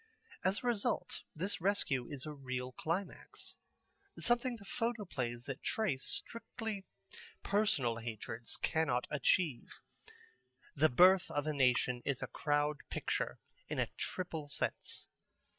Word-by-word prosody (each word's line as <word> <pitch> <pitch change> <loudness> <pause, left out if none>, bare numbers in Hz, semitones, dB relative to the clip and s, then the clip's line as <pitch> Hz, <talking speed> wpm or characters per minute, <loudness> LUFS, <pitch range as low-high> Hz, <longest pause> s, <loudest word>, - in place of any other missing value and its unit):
As 195 - +3
a - - -5
result 230 -4 0
this 185 +4 -1
rescue 165 -10 +2
is 140 -3 -4
a 155 - -4
real 130 -2 -3
climax, 170 +8 -4 0.6
something 240 +1 +2
the 200 - -13
photoplays 195 - -2
that 135 -1 -5
trace 175 -12 0
strictly 225 -3 -5 0.6
personal 200 - +2
hatreds 115 0 -4
cannot 155 -6 +1
achieve. 150 -1 +1 1.0
The 155 +2 +5
Birth 180 +8 +7
of 145 0 -1
a 155 - +1
Nation 125 -2 +3
is 140 -2 0
a - - -2
Crowd 145 0 +2
Picture - - -1 0.3
in - - -2
a - - +1
triple 165 -5 -3
sense. - - -2
150 Hz, 125 wpm, -36 LUFS, 130-200 Hz, 1.0 s, Birth